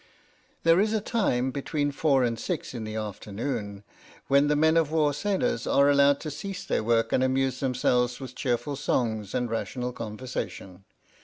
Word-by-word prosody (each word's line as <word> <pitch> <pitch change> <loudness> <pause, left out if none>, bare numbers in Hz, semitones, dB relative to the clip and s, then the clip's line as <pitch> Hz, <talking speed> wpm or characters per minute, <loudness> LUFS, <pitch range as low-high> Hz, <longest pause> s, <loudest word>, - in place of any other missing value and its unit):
There 165 +1 +5
is 215 +2 +2
a 220 - +2
time, 130 - 0
between 145 +1 -2
four 140 -2 +2
and 115 -2 -1
six 175 -2 -4
in 115 -3 -5
the 110 0 -5
after 105 -1 -6
noon, 100 -3 -4 0.5
when 140 +1 +5
the 150 - +2
men 160 +2 +3
of 160 -2 +2
war 150 -2 +2
sailors 205 - -1
are 140 +1 +4
allowed 140 0 +4
to 155 - -5
cease 195 +5 -6
their - - 0
work 115 0 +1
and 130 - +3
amuse 130 0 +1
themselves 125 -2 +1
with 130 -2 -8
cheer 125 -2 0
ful 140 +5 -6
songs 110 -7 -1
and 125 -1 0
rational 125 +2 -3
conversation. 105 -5 -6
130 Hz, 180 wpm, -27 LUFS, 115-145 Hz, 0.5 s, There